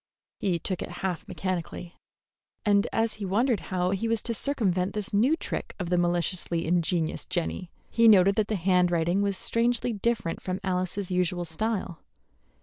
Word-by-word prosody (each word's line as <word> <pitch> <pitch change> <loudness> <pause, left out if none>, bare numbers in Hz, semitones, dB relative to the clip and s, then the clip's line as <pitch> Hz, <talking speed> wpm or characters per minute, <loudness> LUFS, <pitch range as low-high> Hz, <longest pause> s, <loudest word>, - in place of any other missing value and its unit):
He 185 -4 +1
took 185 +2 -3
it - - -4 0.2
half 180 -3 -3
mechanically, 180 -1 -4 0.7
and 205 +1 +3
as 225 0 +1
he - - -2
wondered 220 +4 +2
how 180 -1 0
he 200 +4 -1
was 225 -1 0
to 235 - -1
circumvent 195 -8 0
this 210 -1 -4
new 245 +10 +4
trick - - -5
of 180 -3 -4
the 180 - +3
maliciously 175 -1 0
ingenious 170 -1 0
Jenny, 175 +1 -3 0.2
he 230 0 +4
noted 195 -2 +7
that 210 0 0
the 220 - -1
handwriting 180 -1 +2
was 200 -1 0
strangely 235 +2 +1
different 215 -5 -1
from 185 0 -3
Alice's 185 0 -2
usual 180 -1 0
style. 185 0 -3
185 Hz, 160 wpm, -27 LUFS, 175-215 Hz, 0.7 s, noted